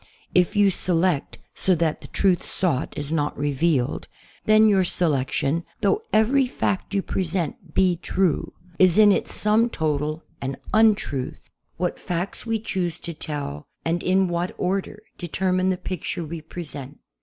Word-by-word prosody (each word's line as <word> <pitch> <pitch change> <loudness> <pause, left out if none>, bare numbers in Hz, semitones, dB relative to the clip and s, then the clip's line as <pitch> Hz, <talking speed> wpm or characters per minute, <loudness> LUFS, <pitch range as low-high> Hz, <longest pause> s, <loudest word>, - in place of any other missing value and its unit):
If 180 +3 +3
you 205 -1 +5
select 175 -4 0 0.2
so 185 - +2
that 160 -2 0
the - - -10
truth 185 -4 +2
sought 160 -8 -1
is 145 0 -4
not 150 -2 -1
revealed, 145 -1 0 0.4
then 215 0 +6
your 195 -3 +4
selection, 155 -2 0 0.2
though 425 - +2
every 255 +5 +3
fact 200 -5 -2
you 195 - +1
present 175 -3 -3
be 185 -2 +3
true, 180 -2 0 0.3
is 185 -1 +5
in 210 -1 +8
its - - 0
sum 220 +3 +3
total 155 -3 -1 0.2
an 135 0 -3 0.2
un 220 -1 +6
truth. 135 -8 -6 0.3
What 180 +1 -2
facts 180 +5 -3
we 225 0 +1
choose 185 -6 -2
to 170 - -6
tell, 145 - -5 0.2
and 165 +1 0
in 190 +1 +2
what 175 +1 -2
order, 195 +3 -2 0.2
determine 185 +1 0
the 185 - 0
picture 180 -1 -4
we 160 +1 -6
i)resent. 150 -4 -8
175 Hz, 155 wpm, -24 LUFS, 155-195 Hz, 0.4 s, in